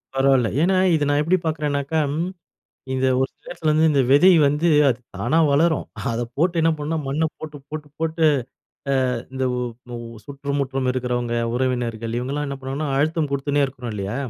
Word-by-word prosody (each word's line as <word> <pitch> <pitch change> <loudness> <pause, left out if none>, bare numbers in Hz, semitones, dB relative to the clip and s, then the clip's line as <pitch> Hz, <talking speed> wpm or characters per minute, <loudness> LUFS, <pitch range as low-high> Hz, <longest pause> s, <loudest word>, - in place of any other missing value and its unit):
பரவால்ல. 135 -3 +3
ஏன்னா, 185 +3 +3 0.2
இத 150 - +1
நான் 145 0 +2
எப்டி 170 +5 +2
பாக்குறனாக்கா, 150 -1 -1 1.0
இத 130 0 +1 0.2
ஒரு 135 - +1
சில - - -25
இடத்துல 160 -3 -1
வந்து 155 +1 +4
இந்த 140 -2 +3
விதை 175 +7 +7 0.2
வந்து 150 +4 +1 0.2
அது 125 -1 -1 0.2
தானா 150 +7 +1
வளரும். 160 +2 +2 0.3
அத 115 +1 -2 0.2
போட்டு 170 +3 +1
என்ன 165 0 +4
பண்ணணும்னா 150 0 -3
மண்ண 145 +4 0
போட்டு, 150 -2 -8
போட்டு, 155 -1 -6
போட்டு 160 0 -1 0.9
அ - - 0 0.2
இந்த 130 0 -1 0.5
உ - - -4 0.3
சுற்றுமுற்றும் 140 -2 -2
இருக்குறவங்க 120 -2 -2 0.2
உறவினர்கள், 120 -3 -1
இவங்கலாம் 140 +4 -3
என்ன 140 - -4
பண்ணுவாங்கன்னா 135 +3 -4
அழுத்தம் 155 0 0
கொடுத்துன்னே 140 +1 +1
இருக்குன்னு 125 -4 -6
இல்லயா? 100 +3 -3
140 Hz, 160 wpm, -22 LUFS, 130-155 Hz, 1.0 s, விதை